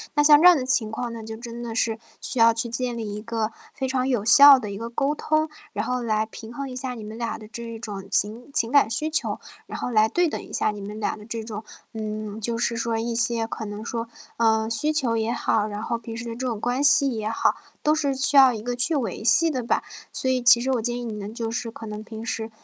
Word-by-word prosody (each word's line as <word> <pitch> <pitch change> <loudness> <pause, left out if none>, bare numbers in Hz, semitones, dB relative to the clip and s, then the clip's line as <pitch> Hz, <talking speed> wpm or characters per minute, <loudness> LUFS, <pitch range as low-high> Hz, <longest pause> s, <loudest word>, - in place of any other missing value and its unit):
那 295 - +4
像 295 0 +7
这 360 - +9
样 355 -3 +8
的 255 - -2
情 245 -5 +1
况 235 +2 -4
那 230 - -7
就 220 0 -7
真 235 0 -8
的 230 -1 -5
是 225 -1 0 0.2
需 255 - -4
要 230 0 +7
去 235 +1 -1
建 240 0 -3
立 210 -3 -4
一 210 - -5
个 225 -1 -2 0.2
非 265 -3 -2
常 260 0 0
有 240 -6 0
效 280 +5 +9
的 210 -4 -5
一 200 - -5
个 230 +1 -5
沟 275 +5 0
通， 310 +1 0 0.2
然 205 +2 -2
后 250 0 -1
来 215 -1 0
平 225 +1 -11
衡 275 +1 -5
一 250 - -7
下 255 0 -4
你 225 -3 -8
们 215 +2 -8
俩 235 -1 -3
的 215 - -12
这 230 0 -7
种 200 -3 -7
情 225 +8 -1
情 230 +1 +1
感 280 -6 +5
需 305 +7 -1
求， 315 - -1 0.3
然 - - -7
后 - - -2
来 215 -1 +4
对 350 -1 +2
等 - - -4
一 - - -13
下 - - +1
你 210 - -8
们 210 +2 -7
俩 210 - -1
的 210 - -12
这 230 -1 -5
种 215 -1 -6 0.3
嗯， 215 -1 -5
就 230 +2 -2
是 235 0 0
说 230 -1 -1
一 230 +1 -2
些 235 -1 +1
可 220 - -5
能 205 +1 -6
说 230 0 -4 0.3
嗯， 220 -1 +2
需 300 +7 +1
求 245 -7 +1
也 225 +1 0
好， 215 -1 +1
然 210 0 -5
后 235 - -1
平 225 0 -8
时 230 +1 -6
的 230 - -5
这 255 +1 -3
种 225 -4 -2
关 245 +4 -1
系 290 -1 +5
也 220 -2 -3
好， 225 - +1 0.3
都 305 - +4
是 285 -3 0
需 280 +1 +1
要 265 -2 +8
一 215 - -5
个 245 +2 -3
去 280 +6 +2
维 225 -7 -2
系 325 +8 +4
的 255 -3 -2
吧。 235 - 0 0.3
所 260 - -1
以 255 -1 +1
其 240 0 +6
实 265 +1 0
我 245 -3 +1
建 240 +1 -2
议 245 - -5
你 230 -2 -4
们， 210 +1 -6
就 230 -1 -3
是 230 0 -3
可 225 - -9
能 210 0 -6
平 220 +1 -8
时 225 0 -3
230 Hz, 290 characters per minute, -24 LUFS, 220-255 Hz, 0.3 s, 这